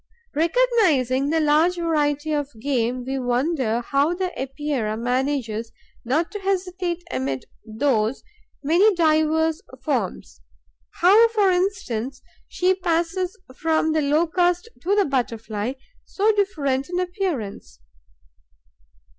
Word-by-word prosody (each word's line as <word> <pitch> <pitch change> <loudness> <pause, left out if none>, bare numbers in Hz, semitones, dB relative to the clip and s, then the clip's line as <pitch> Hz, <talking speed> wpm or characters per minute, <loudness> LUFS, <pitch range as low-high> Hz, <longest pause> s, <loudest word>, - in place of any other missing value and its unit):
Recognizing 315 - +2
the 325 +1 +2
large 310 +4 +3
variety 310 -3 0
of 290 -5 -3
game, 250 -1 -1
we 270 +1 -2
wonder 245 -1 0
how 280 +7 +1
the 365 0 -2
Epeira 265 -5 -3
manages 240 -2 -1 0.3
not 310 - 0
to 415 - -5
hesitate 365 -2 -2
amid 130 0 -2 0.2
those 225 0 0 0.4
many 365 +8 +4
diverse 320 0 +2 0.2
forms, 190 - -3 0.6
how, 410 +6 +7
for 420 -4 +2
instance, 355 - -2 0.2
she 365 +1 +1
passes 355 0 -1 0.2
from 320 0 +1
the 310 0 +1
Locust 345 +6 +1
to 390 +4 +1
the 405 -2 +3
Butterfly, 230 -4 -2 0.3
so 420 +2 +1
different 305 -9 0
in 355 0 -1
appearance. 345 - -4
305 Hz, 110 wpm, -23 LUFS, 255-360 Hz, 0.6 s, how